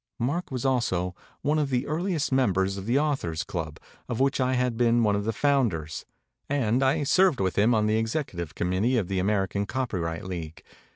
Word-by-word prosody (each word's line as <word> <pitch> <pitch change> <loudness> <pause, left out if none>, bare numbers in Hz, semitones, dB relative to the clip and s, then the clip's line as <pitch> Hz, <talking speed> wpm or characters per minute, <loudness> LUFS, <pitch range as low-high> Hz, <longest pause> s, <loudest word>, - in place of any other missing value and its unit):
Mark 145 +10 -2
was 130 -2 -4
also 95 -9 0 0.3
one 150 +2 +2
of 145 -2 0
the 125 0 0
earliest 160 -1 -1
members 95 -7 +2
of 100 +1 -7
the 120 +3 +3
Authors 135 - 0
Club, 80 -4 -5 0.3
of 120 - -2
which 135 0 +2
I 130 0 +1
had 125 -1 0
been 120 0 +3
one 105 -2 +3
of 100 0 -2
unders; 115 - 0 0.4
and 130 -3 +1
I 135 +3 +2
served 180 +1 +3
with 95 -2 0
him 110 +4 +4
on 105 -1 +2
the 110 +1 +2
ex 115 0 -1
ecutive 85 - -4
committee 95 +8 +1
of 100 -5 -1
the 95 -1 0
American 100 +1 0
Copyright 90 -11 -2
League. 85 -4 -6
115 Hz, 190 wpm, -26 LUFS, 95-135 Hz, 0.4 s, him